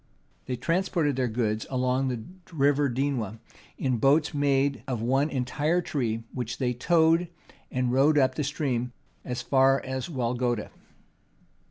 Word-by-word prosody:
They 125 Hz, -, -1 dB
transported 165 Hz, +1 st, 0 dB
their 130 Hz, -1 st, 0 dB
goods 110 Hz, -2 st, -1 dB
along 130 Hz, +1 st, 0 dB
the 120 Hz, -4 st, -3 dB, 0.3 s
River 145 Hz, -2 st, +2 dB
Dwina 120 Hz, -5 st, -2 dB, 0.4 s
in 130 Hz, -3 st, 0 dB
boats 145 Hz, +7 st, +3 dB
made 140 Hz, -2 st, +1 dB
of 125 Hz, -4 st, -2 dB
one 135 Hz, +5 st, +2 dB
entire 145 Hz, +6 st, 0 dB
tree, 115 Hz, -9 st, -2 dB
which 120 Hz, -2 st, -4 dB
they 125 Hz, -2 st, 0 dB
towed 165 Hz, +6 st, +3 dB, 0.4 s
and 125 Hz, -1 st, -1 dB
rowed 140 Hz, +4 st, +4 dB
up 130 Hz, -2 st, +4 dB
the 150 Hz, -, -2 dB
stream 130 Hz, -4 st, -2 dB, 0.3 s
as 125 Hz, -1 st, -4 dB
far 135 Hz, 0 st, +4 dB
as 130 Hz, +4 st, -4 dB
Walogda. 120 Hz, -4 st, -1 dB
130 Hz, 140 wpm, -27 LUFS, 125-145 Hz, 0.4 s, rowed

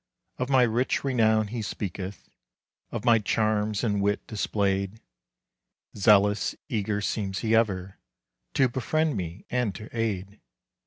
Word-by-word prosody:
Of 125 Hz, +1 st, -1 dB
my 130 Hz, -2 st, +5 dB
rich 120 Hz, +2 st, +1 dB
renown 110 Hz, -5 st, +2 dB
he 115 Hz, +1 st, -3 dB
speaketh, 95 Hz, -2 st, -5 dB, 0.6 s
Of -, -, -5 dB
my 115 Hz, -2 st, +6 dB
charms 105 Hz, 0 st, 0 dB
and 105 Hz, -4 st, +1 dB
wit 100 Hz, 0 st, 0 dB
displayed. 100 Hz, -1 st, -1 dB, 1.0 s
Zealous, 105 Hz, 0 st, +4 dB
eager 105 Hz, -4 st, -1 dB
seems 100 Hz, -2 st, -2 dB
he 110 Hz, 0 st, +2 dB
ever 95 Hz, -4 st, 0 dB, 0.6 s
To 135 Hz, -, +5 dB
befriend 150 Hz, +5 st, 0 dB
me 90 Hz, -1 st, -5 dB
and 125 Hz, -6 st, 0 dB
to 110 Hz, +3 st, -10 dB
aid. 105 Hz, -3 st, -2 dB
105 Hz, 125 wpm, -27 LUFS, 100-115 Hz, 1.0 s, my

